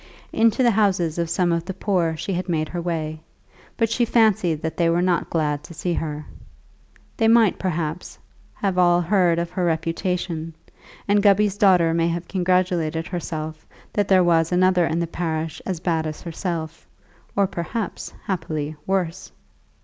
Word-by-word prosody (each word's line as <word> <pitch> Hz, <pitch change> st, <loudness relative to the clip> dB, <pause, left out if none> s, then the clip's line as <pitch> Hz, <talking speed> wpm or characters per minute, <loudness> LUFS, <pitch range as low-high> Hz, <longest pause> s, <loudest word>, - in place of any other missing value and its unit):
Into 230 Hz, +3 st, +3 dB
the 240 Hz, -, +5 dB
houses 185 Hz, -6 st, +1 dB
of 170 Hz, -1 st, -1 dB
some 175 Hz, +1 st, +1 dB
of 170 Hz, 0 st, -1 dB
the 190 Hz, -1 st, -5 dB
poor 175 Hz, -5 st, 0 dB
she 195 Hz, -, -3 dB
had 180 Hz, +1 st, -3 dB
made 155 Hz, -2 st, 0 dB
her 175 Hz, -, -4 dB
way, 160 Hz, -2 st, -3 dB, 0.6 s
but 230 Hz, -, +2 dB
she 230 Hz, +2 st, 0 dB
fancied 210 Hz, -9 st, +2 dB
that 160 Hz, -, -2 dB
they 170 Hz, -1 st, +2 dB
were 170 Hz, +1 st, +2 dB
not 180 Hz, -2 st, +1 dB
glad 150 Hz, -3 st, -1 dB
to 170 Hz, -, -11 dB
see 175 Hz, +2 st, -2 dB
her. 150 Hz, -2 st, -4 dB, 0.9 s
They 225 Hz, -, +3 dB
might, 225 Hz, -3 st, +4 dB
perhaps, 170 Hz, -2 st, -3 dB, 0.4 s
have 190 Hz, -3 st, -1 dB
all 175 Hz, -1 st, +5 dB
heard 175 Hz, -2 st, +2 dB
of 170 Hz, 0 st, -2 dB
her 180 Hz, 0 st, -2 dB
reputation, 165 Hz, 0 st, -2 dB, 0.5 s
and 205 Hz, 0 st, +3 dB
Gubby's 205 Hz, 0 st, +4 dB
daughter 180 Hz, -5 st, +4 dB
may 165 Hz, 0 st, +2 dB
have 170 Hz, +1 st, -3 dB
congratulated 180 Hz, -3 st, 0 dB
herself 160 Hz, -3 st, -5 dB, 0.3 s
that 205 Hz, -1 st, +1 dB
there 185 Hz, -2 st, +5 dB
was 165 Hz, -1 st, +3 dB
another 180 Hz, -1 st, +3 dB
in 160 Hz, -, -1 dB
the 170 Hz, -, 0 dB
parish 160 Hz, -2 st, -3 dB
as 185 Hz, -4 st, -2 dB
bad 165 Hz, -2 st, 0 dB
as 155 Hz, -, -7 dB
herself, 165 Hz, -1 st, -5 dB, 0.5 s
or 200 Hz, -, +3 dB
perhaps, 185 Hz, +3 st, -4 dB
happily, 155 Hz, -5 st, -3 dB
worse. 185 Hz, -2 st, -2 dB
175 Hz, 165 wpm, -23 LUFS, 165-190 Hz, 0.9 s, the